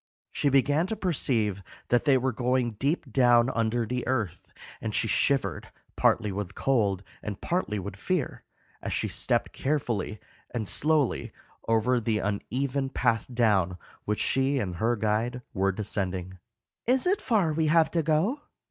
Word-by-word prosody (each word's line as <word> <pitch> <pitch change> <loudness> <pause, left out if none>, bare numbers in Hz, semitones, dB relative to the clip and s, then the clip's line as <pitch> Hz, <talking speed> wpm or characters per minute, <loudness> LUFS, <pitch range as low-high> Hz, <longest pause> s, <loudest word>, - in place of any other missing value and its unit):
She 145 - +1
began 145 +5 +3
to 220 - -2
perceive 120 - 0 0.3
that 120 +3 +2
they 140 -3 +5
were 130 +1 0
going 125 0 0
deep 145 +6 -1
down 120 -1 +5
under 115 +1 0
the 125 +1 -3
earth, 115 -9 -2 0.3
and - - -3
she - - +2
shivered, 110 - 0 0.2
partly 105 -3 +2
with 100 0 -5
cold 105 -8 +1 0.2
and 105 -2 -5
partly 170 - -1
with 95 0 -5
fear, 160 - -2 0.4
as - - -3
she - - 0
stepped - - 0
carefully 120 -8 -1 0.3
and 110 -4 -3
slowly 150 +1 +1 0.4
over 115 +2 +3
the 110 -1 0
uneven 130 +7 -2
path 115 -4 +1
down 105 -7 +2 0.3
which 105 0 -1
she 135 +1 +2
and 90 -8 -2
her 115 +5 +1
guide 115 +4 -1
were 95 -1 +2
descending. 95 -2 -3 0.5
"Is 255 +1 +3
it 380 +3 +2
far 200 -10 +2
we 160 0 +1
have 160 +1 +4
to 170 - +1
go?" 165 - +1
120 Hz, 155 wpm, -27 LUFS, 105-140 Hz, 0.5 s, they